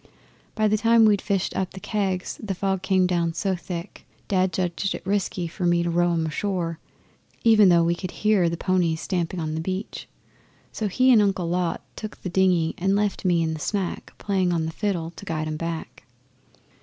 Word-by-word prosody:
By 215 -1 +2
the 215 0 +2
time 230 0 +5
we'd 205 -2 +4
fished 195 -3 -1
up 190 0 -2
the - - -6
kegs 190 -3 -2
the 205 -4 -3
fog 190 0 -1
came 190 -1 +2
down 170 -2 0
so 195 -2 0
thick 175 -1 -7 0.2
Dad 185 -2 +2
judged 180 +2 -1
it - - -9
risky 195 -2 -1
for 175 +2 -2
me 175 0 +3
to 170 - -1
row 175 +1 +2
'em 165 -1 0
ashore, 165 0 -2 0.6
even 215 -4 +6
though 170 -1 +5
we 170 +1 +2
could 185 +1 -5
hear 205 -3 +2
the 170 - -3
ponies 175 -3 +1
stamping 175 0 -2
on 155 -1 -2
the 160 - -2
beach. 190 +4 -4 0.6
So 215 - -2
he 255 +6 +3
and 225 -4 +7
Uncle 190 -4 +1
Lot 175 0 -1
took 215 -1 -7
the 185 - -5
dinghy 180 -3 +2
and 195 +2 +2
left 205 -1 -1
me 175 -2 +3
in 160 0 -1
the 155 - -5
smack 195 +2 -3
playing 190 -3 0
on 165 -2 0
my 160 - -3
fiddle 170 -3 -2
to - - -12
guide 155 -1 -3
'em 155 0 -3
back. 165 0 -5
185 Hz, 205 wpm, -24 LUFS, 170-200 Hz, 0.6 s, and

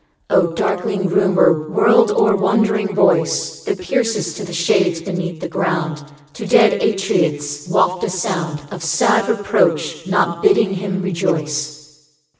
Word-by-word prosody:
O 180 - +4
darkling 190 +2 -2
rumour, 175 -4 +2
world 225 +6 +4
o'er 210 0 +2
wandering 210 0 0
voice - - +1
That 410 -2 -2
piercest 230 - -1
to 210 - -6
the 180 - -8
shades 170 0 +1
beneath 175 -1 -5
the - - -4
ground, 155 -4 -3 0.3
To 210 +6 -7
dead 220 +2 +4
Atrides 150 -7 -1
waft 180 +1 +1
a - - -1
sound 175 -5 -3
Of 180 - -8
sad 170 +7 +1
reproach, 220 - 0
not - - 0
bidding 395 - +3
him 190 0 -4
rejoice. 150 -4 -4
185 Hz, 135 wpm, -18 LUFS, 160-205 Hz, 0.3 s, O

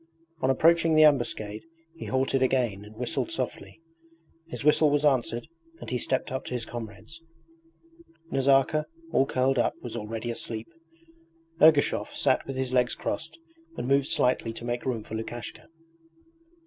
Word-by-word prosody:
On 130 - +2
approaching 165 +4 +4
the 155 - +7
ambuscade 120 -7 +2 0.3
he 165 - -9
halted 130 0 +1
again 125 -6 +1
and 105 +1 -13
whistled 125 - -2
softly. 330 - -5 0.7
His 165 - -6
whistle 150 0 +5
was 145 +1 +1
answered 125 -1 +1 0.3
and - - -8
he 125 - 0
stepped 130 +2 -1
up 130 +1 -3
to 125 - -4
his 120 - -3
comrades. 115 +7 -9 1.1
Nazarka, 135 +3 +3 0.3
all 135 - +3
curled 130 0 +1
up, - - +1
was 120 -2 -5
already 115 +1 -4
asleep. 115 -1 -5 1.0
Ergushov 155 -2 +4
sat - - +2
with 135 - -4
his 130 -1 -2
legs 125 -1 +2
crossed 160 - -4 0.4
and - - -3
moved 140 0 +3
slightly 125 -2 +1
to 115 - -8
make 120 +1 -3
room 115 -4 -1
for 110 - -11
Lukashka. 115 +1 -6
130 Hz, 150 wpm, -27 LUFS, 120-140 Hz, 1.1 s, the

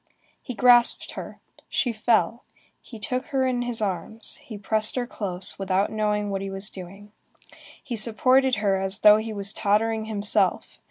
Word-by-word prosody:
He 250 - -7
grasped 240 0 +4
her, - - -9 0.3
she 245 - 0
fell, 220 -1 +1 0.4
he 230 - -12
took 250 +5 -3
her 270 -4 0
in 250 -1 0
his 245 -2 -2
arms, 205 +3 -4
he 220 - -10
pressed 215 +1 +1
her 250 -1 -1
close, 190 -6 -4
without 195 +1 0
knowing 210 -1 -1
what 195 -1 -3
he 195 - -4
was 195 +1 -5
doing. 195 +3 -11 0.7
He 255 -6 -5
supported 255 +4 +3
her, 195 -2 0 0.2
though 210 0 +8
he 220 +1 -4
was 200 -1 -3
tottering 220 +2 0
himself. 210 -1 0
215 Hz, 160 wpm, -24 LUFS, 200-240 Hz, 0.7 s, though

